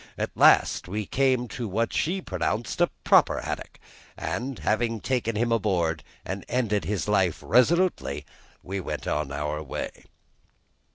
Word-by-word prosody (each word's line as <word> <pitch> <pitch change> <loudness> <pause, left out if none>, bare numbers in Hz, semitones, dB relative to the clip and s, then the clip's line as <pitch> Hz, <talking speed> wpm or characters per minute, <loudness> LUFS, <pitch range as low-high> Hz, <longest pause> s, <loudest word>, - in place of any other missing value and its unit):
At - - -2
last - - +5
we 105 +3 -3
came 130 +1 +1
to 120 -3 -4
what 110 +4 -1
she 185 +4 0
pronounced 115 +9 -2
a 175 - +4
proper - - +5
haddock, - - -5 0.4
and 120 - -3
having 115 +1 0
taken 115 -2 -1
him 115 +2 +1
on 115 - +2
board 85 -6 0 0.2
and 95 +2 -4
ended 110 -5 0
his 100 -8 -2
life - - +1
resolutely, 125 - +2 0.4
we 95 +2 -4
went 95 - -5
our 75 +1 -2
way. 75 - -6
110 Hz, 145 wpm, -26 LUFS, 90-125 Hz, 0.4 s, last